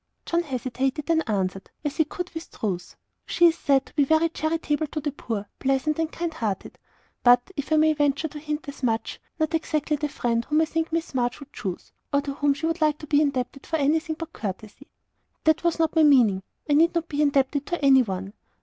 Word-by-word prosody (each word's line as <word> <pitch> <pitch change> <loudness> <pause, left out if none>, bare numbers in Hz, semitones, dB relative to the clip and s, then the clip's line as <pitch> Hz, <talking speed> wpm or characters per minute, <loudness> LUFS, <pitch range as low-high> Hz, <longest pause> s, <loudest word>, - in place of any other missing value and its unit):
John 340 0 +1
hesitated, 265 0 -2
then 330 0 +2
answered, 195 -3 -2 0.2
as 295 0 -2
he 315 - +4
could 360 +4 -6
with 325 0 -7
truth, 180 -5 -4 0.3
"She 345 - +4
is 330 -1 +6
said 275 -4 +2
to - - -18
be 290 - +3
very 315 +3 +3
charitable 315 -1 -1
to 305 - -4
the 295 0 -2
poor, 225 -6 -4
pleasant 270 +3 0
and 325 -1 0
kind 335 -1 -3
hearted. 215 -10 -4 0.4
But, 245 +6 +5
if 285 +1 -5
I - - +5
may 310 0 +4
venture 290 +1 +1
to 295 - -8
hint 300 0 -4
as 280 - -8
much, 230 -3 -1 0.2
not 315 0 0
exactly 305 -2 0
the 295 +1 -2
friend 235 -5 0
whom 305 +1 +2
I - - +3
think 325 +1 -2
Miss 330 -2 -2
March 245 -1 0
would 285 0 -13
choose, 185 -5 -5 0.2
or 280 - +3
to 280 -1 -4
whom 285 0 +1
she 310 +3 -4
would 330 +1 -1
like 305 -1 +3
to 305 - -9
be 295 0 +3
indebted 275 -2 -2
for 325 - -1
anything 315 +2 +1
but 330 0 -7
courtesy." 210 +6 -7 0.6
"That 315 +1 +3
was 340 -1 +1
not 325 -1 +1
my 320 - +5
meaning. 245 -10 +5 0.3
I 295 - +2
need 330 +4 +4
not 335 -1 0
be 295 -1 -1
indebted 285 -1 +2
to 345 -5 -1
any 265 -1 +7
one. 195 -3 -4
295 Hz, 220 wpm, -25 LUFS, 260-320 Hz, 0.6 s, any